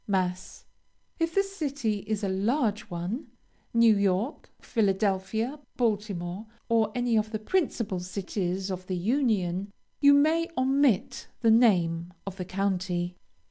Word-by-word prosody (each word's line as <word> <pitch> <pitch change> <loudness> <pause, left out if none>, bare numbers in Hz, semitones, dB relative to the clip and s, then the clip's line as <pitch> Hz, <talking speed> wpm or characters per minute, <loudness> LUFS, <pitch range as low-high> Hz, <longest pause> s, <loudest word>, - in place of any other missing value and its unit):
Mass. 185 -2 -2 0.5
If 330 0 0
the 395 - +4
city 285 - -2
is 215 -1 -2
a - - +1
large 210 +3 0
one, 180 - -4 0.4
New 230 -2 +5
York, 200 +6 0
Philadelphia, 210 +5 0 0.2
Baltimore, 205 -4 -1 0.2
or 225 -2 +3
any 245 -1 +1
of 215 0 -2
the 215 - -2
principal 230 - -1
cities 185 0 -3
of 185 0 -5
the 185 - -2
Union, 200 -4 0 0.3
you 285 0 +7
may 320 +4 +3
omit 260 -4 +2
the 230 -2 +5
name 180 -7 +3
of 195 -1 -6
the 180 - -4
county. 185 -2 -1
210 Hz, 130 wpm, -28 LUFS, 185-245 Hz, 0.5 s, you